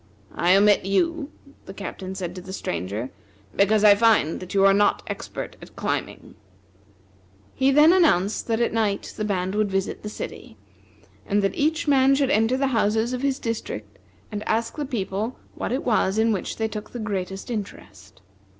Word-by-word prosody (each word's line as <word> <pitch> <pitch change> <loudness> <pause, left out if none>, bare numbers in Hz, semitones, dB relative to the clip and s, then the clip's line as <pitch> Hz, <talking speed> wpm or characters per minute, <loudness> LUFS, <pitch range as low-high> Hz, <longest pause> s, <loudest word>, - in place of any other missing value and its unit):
"I 180 +2 +3
omit 205 +1 +4
you," 300 - 0 0.4
the 195 - -9
Captain 190 -1 -6
said 180 -2 -4
to 180 - -8
the 190 +1 -9
Stranger, 100 - -4 0.4
"because 205 +2 +3
I 210 -1 +9
find 210 -7 +3
that 185 +1 -8
you 195 0 +5
are 195 - +6
not 205 +1 +2
expert - - -6
at - - -13
climbing." - - -4 1.2
He 265 0 +2
then 300 +5 +6
announced 220 - +2
that 225 -1 0
at 235 - +1
night 215 -3 -1
the 215 - -3
band 190 -2 -1
would 210 -1 +1
visit 195 0 -2
the 210 - -6
city, 110 - -8 0.7
and 205 0 0
that 195 - +1
each 315 +2 0
man 275 -1 +5
should 275 -1 +1
enter 225 +1 +2
the 275 0 +1
houses 225 +2 +1
in 250 - -3
his 275 -1 0
district, 105 - -5 0.3
and 210 -1 -4
ask 230 +1 0
the 295 - -3
people 215 -1 -3 0.2
what - - -4
it 260 - -1
was 215 -4 +1
in 225 +1 +3
which 195 -4 -3
they 220 - 0
took 215 -1 -7
the 245 - -5
greatest 195 -1 -4
interest. 100 - -8
210 Hz, 180 wpm, -24 LUFS, 190-240 Hz, 1.2 s, I